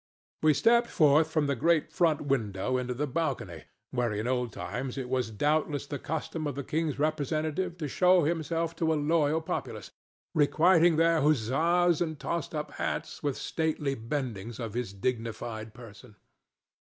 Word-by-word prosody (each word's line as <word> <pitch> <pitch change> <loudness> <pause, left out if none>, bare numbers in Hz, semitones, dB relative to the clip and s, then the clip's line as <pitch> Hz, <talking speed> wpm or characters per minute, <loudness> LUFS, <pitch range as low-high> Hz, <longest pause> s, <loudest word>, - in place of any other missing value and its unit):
We 155 -1 +4
stepped 235 - +4
forth 155 +1 +4
from 155 -2 +1
the 140 -1 0
great 160 +4 +2
front 165 -4 +2
window 125 -4 -1
into 125 -1 -2
the 145 +4 -1
balcony 130 - -3 0.3
where 120 -2 0
in 105 +1 -2
old 125 -1 0
times 125 +8 -5
it 130 -2 -4
was 125 -3 0
doubtless 145 +5 0
the 145 -1 -5
custom 160 +1 -3
of 145 - -4
the 140 - -4
king's 155 +1 -1
representative 155 +4 -1
to 155 -3 -3
show 180 +4 +4
himself 165 +1 -1
to 160 -1 +1
a - - +2
loyal 155 +1 +2
populace, 160 - -5 0.4
requiting 165 +3 +4
their 165 0 +3
huzzas 155 +6 +2
and 160 -3 -1
tossed 165 0 -3
up 150 0 -3
hats - - -4
with 145 -3 -1
stately 155 -3 -1
bendings 115 -3 -4
of 115 -4 -5
his 120 -4 -3
dignified 110 +1 -4
person. 115 -1 -13
145 Hz, 160 wpm, -29 LUFS, 125-160 Hz, 0.4 s, We